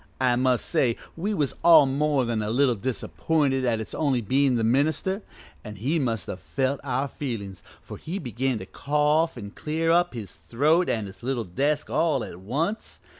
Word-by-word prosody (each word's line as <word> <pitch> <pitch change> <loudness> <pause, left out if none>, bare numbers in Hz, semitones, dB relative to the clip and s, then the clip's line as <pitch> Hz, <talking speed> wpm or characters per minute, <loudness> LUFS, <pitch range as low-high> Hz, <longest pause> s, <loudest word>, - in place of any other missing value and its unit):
I 125 -2 +3
must 125 -1 +1
say 130 -8 +1 0.2
we 205 +6 -2
was 145 -6 0
all 165 -3 +8
more 140 0 +1
than 115 -2 -1
a 105 - -2
little 125 +2 +3
disappointed 130 +4 -1
at 115 -3 +1
its 110 - -6
only 140 -5 +1
bein' 130 +4 +2
the 115 - 0
minister, 155 - +1 0.4
an' 105 - -8
he 135 - 0
must 115 - -1
have 95 - -6
felt 135 +8 -1
our 135 0 -1
feelin's, 100 - -6 0.2
for - - -9
he 175 +5 -5
began 130 - -2
to 95 - -7
cough 150 - +1
an' 100 -3 -7
clear 160 +6 -1
up 175 -5 +2
his 100 -8 -7
throat 145 - +1
an' 110 -3 -1
his 95 - -11
little 125 -1 -2
desk 140 +11 -1
all 150 -7 +1
at 85 - -8
once. 150 - -3
130 Hz, 185 wpm, -25 LUFS, 115-150 Hz, 0.4 s, all